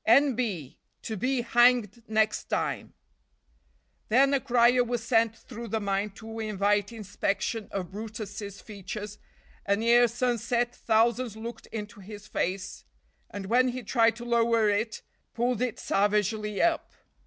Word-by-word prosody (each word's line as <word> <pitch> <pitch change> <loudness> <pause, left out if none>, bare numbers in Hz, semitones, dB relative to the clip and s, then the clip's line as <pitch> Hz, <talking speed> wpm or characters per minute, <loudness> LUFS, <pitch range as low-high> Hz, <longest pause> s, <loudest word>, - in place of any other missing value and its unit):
N 275 +4 +6
B 205 - -3 0.2
To 220 - -4
be 250 +5 0
hanged 240 -2 +3
next 220 -1 +1
time. - - -2 1.1
Then 270 +5 +4
a 275 - +3
crier 245 -1 +4
was 240 -1 -3
sent 225 -1 +2
through 235 -1 -9
the 220 +1 -1
mine 200 0 -1
to 225 0 -8
invite 205 -1 0
inspection 210 0 -2
of 185 -3 -4
brutus's 205 -1 -7
features, 210 0 -7 0.4
and 200 +2 0
ere 240 +1 +6
sunset 240 0 0
thousands 230 0 +1
looked 225 0 -8
into 210 0 -7
his 205 +1 -10
face, 185 +2 -3 0.5
and 200 -1 -6
when 245 +5 +3
he 250 0 -3
tried 225 0 +3
to 240 +1 -8
lower 230 -2 +3
it 220 +2 -1 0.3
pulled 240 0 0
it 250 -3 -1
savagely 210 +1 0
up. 335 -1 +1
225 Hz, 140 wpm, -28 LUFS, 205-240 Hz, 1.1 s, N